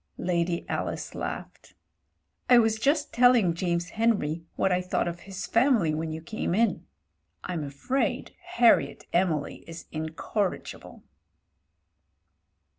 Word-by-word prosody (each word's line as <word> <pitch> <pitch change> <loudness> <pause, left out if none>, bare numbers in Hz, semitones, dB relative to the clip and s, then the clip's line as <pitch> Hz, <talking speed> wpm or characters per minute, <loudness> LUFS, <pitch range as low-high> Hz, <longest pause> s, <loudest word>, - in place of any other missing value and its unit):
Lady 170 -1 -1
Alice - - -3
laughed. - - -7 0.7
"I 250 - +8
was 220 -1 +3
just 290 +4 +1
telling 240 -7 +5
James 170 0 -1
Henry 205 -9 0
what 190 - +1
I 180 0 +2
thought 180 -1 -1
of 175 0 -4
his 190 0 -5
Family 230 - +3
when 160 +1 -3
you 160 +1 -5
came 180 -1 -2
in. 225 -4 +1 0.6
Fm 170 -4 -3
afraid 145 - -2 0.2
Harriet 240 -8 +4
Emily 170 -5 0
is 165 0 -9
incorrigible." 160 +5 -4
180 Hz, 115 wpm, -27 LUFS, 165-230 Hz, 0.7 s, I